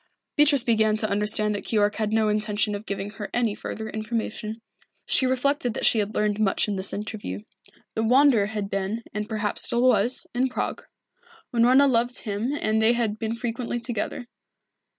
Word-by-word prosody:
Beatrice 290 -3 +5
began 220 -3 +2
to 215 - +1
understand 210 +1 +2
that 205 - -4
Keyork 210 -2 +1
had 215 -1 -1
no 220 -1 +2
intention 210 0 0
of 205 +2 -6
giving 200 0 -4
her 210 -1 -7
any 235 -3 +1
further 220 +1 -6
information. 220 0 -4 0.5
She 260 - +2
reflected 260 -2 0
that - - -1
she 225 - +4
had 210 +1 -2
learned 210 0 0
much 205 -1 +2
in 205 - -2
this 190 0 +2
interview. 205 - -5 0.5
The 220 - -1
Wanderer 245 -2 +4
had 210 -2 -4
been, 195 +4 -3
and 210 +1 -4
perhaps 215 -2 -2
still 240 +1 +1
was, 255 0 +3
in 255 +2 +1
Prague. - - -4 0.7
Unorna 250 +4 +5
loved 245 -1 +1
him 215 +4 -2
and 215 +1 +1
they 225 +2 +4
had 220 -3 -1
been 225 0 -2
frequently 240 +1 -3
together. 235 0 -3
220 Hz, 175 wpm, -25 LUFS, 210-240 Hz, 0.7 s, Beatrice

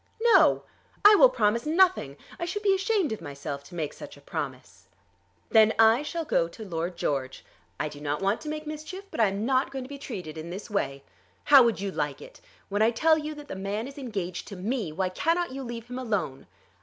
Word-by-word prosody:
"No; - - +5 0.4
I 415 - +11
will 290 -11 +8
promise 230 -1 +1
nothing. 325 - +3 0.2
I 340 - -2
should 410 +5 -4
be 395 -1 +4
ashamed 390 - +1
of 220 - -4
myself 140 0 -6
to 175 - -12
make 155 -4 -3
such - - -10
a - - -15
promise." - - -7 0.6
"Then 220 -1 +6
I 225 +3 +6
shall 325 +2 -4
go 170 - +2
to 215 +6 -10
Lord 170 -1 -4
George. 135 -4 -2 0.3
I 155 - 0
do 145 -1 -10
not 145 0 -2
want 195 +3 0
to 305 - -6
make 305 0 -5
mischief, 310 +6 -7
but - - -6
I 220 - +5
am 200 +3 -2
not 260 +1 +2
going 265 -2 -5
to - - -9
be 280 0 -8
treated 180 - -7
in 160 +2 -7
this 195 +5 -7
way. 140 -9 -2 0.4
How 280 -2 +8
would 235 -4 +2
you 200 0 -3
like - - -2
it? - - -13 0.3
When 205 +1 -1
I 220 - +5
tell 315 +7 +3
you 305 0 -5
that 295 -1 -10
the - - -6
man 200 +5 -3
is 275 +1 -10
engaged 195 -9 -4
to 200 - -8
me 205 -1 -2
why 185 +4 -1
cannot 335 - 0
you 270 +1 -5
leave 235 -3 -6
him 250 +1 -6
alone?" 205 - -3
225 Hz, 225 wpm, -27 LUFS, 185-300 Hz, 0.6 s, I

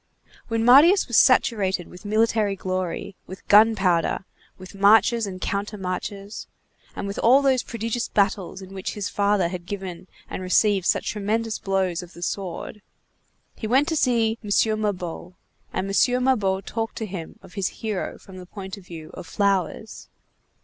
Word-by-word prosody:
When 225 -1 -1
Marius 305 +11 +7
was 240 - +1
saturated 195 -8 +3
with 180 +3 -14
military 215 -1 +1
glory, 185 0 -4
with 190 - -11
gunpowder, 200 -5 +4 0.3
with 185 +1 -12
marches 210 +3 +4
and 185 -1 -7
countermarches, 200 0 -4 0.5
and - - -4
with 200 0 -4
all 260 +5 +5
those 265 -2 +3
prodigious 230 +1 -3
battles 195 -2 0
in 190 +1 -12
which 190 -1 -5
his 205 -3 -3
father 200 -3 +1
had 175 -1 -7
given 190 -3 -6 0.2
and - - -6
received 190 +1 +2
such - - +1
tremendous 220 +2 -2
blows 190 -3 -1
of 180 0 -12
the 170 - -9
sword, 195 +3 -5 0.7
he 220 - -5
went 265 +6 +3
to 320 - -1
see 230 -5 +1
M. 210 - -7 0.3
Mabeuf, 180 -3 -4 0.4
and 185 - -2
M. 250 +5 +2
Mabeuf 200 -7 +1
talked 225 -1 -4
to 220 - -4
him 180 -5 -7
of - - -15
his 195 -3 -1
hero 215 -4 -4
from 190 -1 -14
the 180 -1 -10
point 190 0 -8
of 200 - -13
view 160 -2 -9
of 170 - -9
flowers. 200 +2 -1
200 Hz, 160 wpm, -24 LUFS, 185-225 Hz, 0.7 s, Marius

